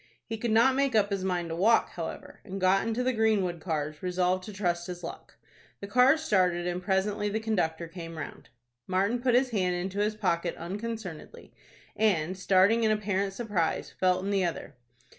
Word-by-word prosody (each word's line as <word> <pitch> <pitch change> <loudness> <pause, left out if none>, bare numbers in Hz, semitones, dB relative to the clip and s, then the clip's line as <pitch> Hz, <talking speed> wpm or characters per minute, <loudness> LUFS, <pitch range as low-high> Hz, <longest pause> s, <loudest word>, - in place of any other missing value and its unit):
He 225 - -4
could 230 +2 -3
not 230 +4 +5
make 275 -2 +1
up 205 -1 +3
his 195 -2 -1
mind 175 -3 -1
to 165 - -3
walk, 220 +7 +3
however, - - -7
and 195 0 -6
got 190 +3 +3
into 230 +2 -1
the 255 +1 +1
Greenwood 210 -6 +1
cars, 155 -2 -3
resolved 180 0 0
to 215 - -7
trust 175 -3 -1
his 180 -1 -7
luck. - - -9 0.4
The - - -6
cars 255 +9 +4
started, 180 - +2
and 180 0 -2
presently 200 +2 0
the 215 +2 -1
conductor 175 -7 -1
came 165 -1 -8
round. 155 - -8 0.4
Martin 200 +6 +1
put 245 -1 +2
his 255 0 +3
hand 185 -4 +1
into 190 +3 -3
his 210 +1 +1
pocket 175 -5 -1
unconcernedly, 200 -1 -7 0.4
and, 185 -5 +1
starting 195 +4 +3
in 220 - +3
apparent 200 -2 0
surprise, 195 -7 -1
felt 185 0 +1
in 200 - -1
the 195 -2 +2
other. 170 -2 -3
195 Hz, 185 wpm, -28 LUFS, 180-220 Hz, 0.4 s, not